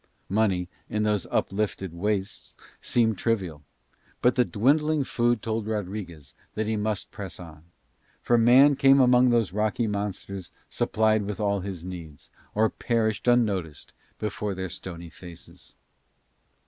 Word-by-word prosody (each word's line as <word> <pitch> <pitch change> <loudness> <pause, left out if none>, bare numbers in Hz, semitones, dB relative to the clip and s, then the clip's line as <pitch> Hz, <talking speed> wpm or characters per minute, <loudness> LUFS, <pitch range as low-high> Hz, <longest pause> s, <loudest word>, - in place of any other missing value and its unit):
Money 95 -3 +1 0.2
in 105 0 -1
those 105 -4 0
uplifted 95 -3 -1
wastes 100 +2 -3 0.3
seemed 110 -4 +1
trivial, 95 -10 -1 0.6
but 125 - +3
the 125 - +3
dwindling 145 +7 +2
food 120 -3 0
told 110 -1 -2
Rodriguez 95 -8 -5 0.2
that 110 - -1
he 110 +1 -1
must 105 -1 -2
press 100 -4 -8
on; 80 -3 -12 0.5
for 120 - +2
man 125 +5 +6
came 135 0 +5
among 125 -1 +5
those 115 -6 +1
rocky 110 +3 0
monsters 100 -2 -4 0.2
supplied 110 0 +2
with 105 +1 -5
all 100 -1 +1
his 95 -3 -6
needs, 85 -5 -9 0.2
or 110 +1 +4
perished 110 -1 -1
unnoticed 100 - +1 0.2
before 105 -1 -3
their 95 0 -4
stony 85 -2 -7
faces. 85 -1 -12
105 Hz, 135 wpm, -26 LUFS, 95-115 Hz, 0.6 s, man